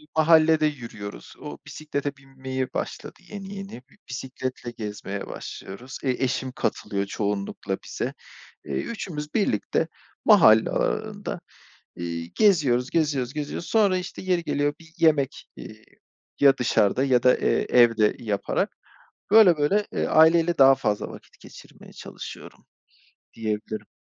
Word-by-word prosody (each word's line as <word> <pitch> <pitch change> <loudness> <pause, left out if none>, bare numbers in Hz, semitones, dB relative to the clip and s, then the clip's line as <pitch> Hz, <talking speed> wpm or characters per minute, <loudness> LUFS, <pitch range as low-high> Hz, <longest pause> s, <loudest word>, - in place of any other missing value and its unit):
Mahallede 160 -1 +5
yürüyoruz. 115 -8 -6
O - - -7
bisiklete 145 -2 -4
binmeye 130 -1 -5
başladı, - - -5
yeni 200 -1 -8
yeni 195 -11 -8 0.3
bisikletle 130 -1 -5
gezmeye 105 -3 -6
başlıyoruz. 125 +8 -8
E, 135 - 0
eşim 130 0 -1
katılıyor 100 -7 -2
çoğunlukla 100 -1 -3
bize. - - -4 0.5
Eee, - - -7
3'ümüz 155 -10 -5
birlikte 210 -3 0 0.4
mahalle - - +7
aralarında, 215 - -2 0.6
eee, 85 -1 -4
geziyoruz 145 - +3
geziyoruz 145 -6 0
geziyoruz, 150 +2 -5
sonra 205 -4 +3
işte 180 0 -6
yeri 180 -2 0
geliyor 145 -2 0
bir 160 -1 -18
yemek, 150 -5 +2
eee, - - -11 0.5
ya 140 -1 +6
dışarıda 120 0 +2
ya 130 -3 +2
da, 125 - +5
eee, - - +1
evde 115 -3 +4
yaparak 105 -4 -2 0.6
böyle 200 -6 +7
böyle, 195 +8 +1
eee, - - -1
aileyle 165 +2 +4
daha 135 0 +8
fazla 105 -5 -2
vakit - - -14
geçirmeye - - -14
çalışıyorum - - -10 0.7
diyebilirim. 110 -1 -4
135 Hz, 120 wpm, -25 LUFS, 120-165 Hz, 0.7 s, daha